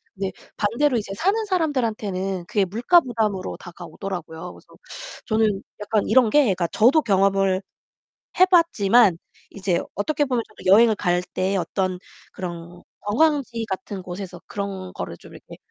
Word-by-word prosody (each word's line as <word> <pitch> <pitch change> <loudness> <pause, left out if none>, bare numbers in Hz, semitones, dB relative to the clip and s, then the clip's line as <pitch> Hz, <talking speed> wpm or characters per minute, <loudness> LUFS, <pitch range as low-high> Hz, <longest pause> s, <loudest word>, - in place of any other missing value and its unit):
근데 190 -1 -3 0.3
반대로 240 +5 +1
이제 205 -2 -4
사는 385 - +1
사람들한테는 215 - -1
그게 205 -2 +1
물가 245 - +4
부담으로 220 - -2
다가오더라고요. 175 -1 -7
그래서 - - -18 0.6
저는 215 -3 +1 0.2
약간 210 0 0
이런 250 -4 +5
게 295 +6 +5
그러니까 185 -6 0
저도 250 - +4
경험을 195 -2 +2 0.8
해 370 - +9
봤지만 240 - +4 0.3
이제 185 -3 -1
어떻게 290 +9 0
보면 250 -3 -1
저도 190 -3 -2
여행을 225 0 +6
갈 180 -2 +1
때 190 +1 0
어떤 185 +1 -2 0.3
그런 175 -1 -7 0.2
관광지 240 0 +1
같은 190 0 -5
곳에서 180 0 -7
그런 195 -2 -5
거를 - - -6
좀 - - -15
이렇게 - - -13
200 Hz, 330 characters per minute, -23 LUFS, 185-235 Hz, 0.8 s, 해